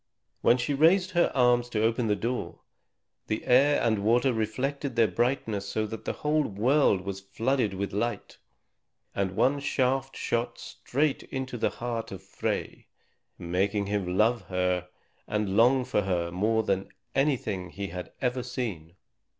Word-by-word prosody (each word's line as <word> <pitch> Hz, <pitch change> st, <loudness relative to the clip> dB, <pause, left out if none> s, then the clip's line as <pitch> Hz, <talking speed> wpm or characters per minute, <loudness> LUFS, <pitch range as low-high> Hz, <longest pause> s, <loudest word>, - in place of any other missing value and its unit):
When 120 Hz, -, +5 dB
she 125 Hz, +4 st, -1 dB
raised 180 Hz, +6 st, +4 dB
her 175 Hz, -2 st, +2 dB
arms 120 Hz, -1 st, +3 dB
to 110 Hz, -2 st, 0 dB
open 115 Hz, +1 st, +1 dB
the 105 Hz, -, +2 dB
door, 120 Hz, +4 st, -4 dB, 0.7 s
the 110 Hz, -, -2 dB
air 140 Hz, +4 st, +5 dB
and 110 Hz, -3 st, +2 dB
water 120 Hz, +5 st, +3 dB
reflected 130 Hz, +5 st, -2 dB
their 115 Hz, -2 st, +4 dB
brightness 115 Hz, -5 st, -1 dB
so 110 Hz, -, -1 dB
that 110 Hz, +1 st, -7 dB
the -, -, -1 dB
whole 155 Hz, +1 st, +3 dB
world 110 Hz, 0 st, +2 dB
was 95 Hz, 0 st, -5 dB
flooded 115 Hz, +2 st, -1 dB
with 100 Hz, 0 st, -3 dB
light, 105 Hz, +1 st, -3 dB, 0.7 s
and 95 Hz, -1 st, -1 dB
one 140 Hz, +6 st, +2 dB
shaft 135 Hz, -1 st, 0 dB
shot 115 Hz, 0 st, -1 dB
straight 140 Hz, +2 st, -2 dB
into 130 Hz, -1 st, -5 dB
the 115 Hz, -, +1 dB
heart 120 Hz, -1 st, -4 dB
of 95 Hz, -1 st, -8 dB
Frey, 95 Hz, -, -4 dB, 0.5 s
making 100 Hz, +4 st, 0 dB
him 95 Hz, -3 st, -2 dB
love 115 Hz, +3 st, +3 dB
her 90 Hz, -1 st, 0 dB, 0.4 s
and 105 Hz, -2 st, -1 dB
long 125 Hz, +3 st, +4 dB
for 115 Hz, -4 st, +1 dB
her 90 Hz, -3 st, -1 dB
more 110 Hz, +5 st, +1 dB
than 95 Hz, -2 st, 0 dB
for -, -, -25 dB, 0.2 s
anything 120 Hz, -10 st, 0 dB
he 100 Hz, +2 st, -5 dB
had 90 Hz, 0 st, -7 dB
ever 125 Hz, -1 st, 0 dB
seen. 105 Hz, -10 st, -5 dB
115 Hz, 160 wpm, -28 LUFS, 100-130 Hz, 0.7 s, When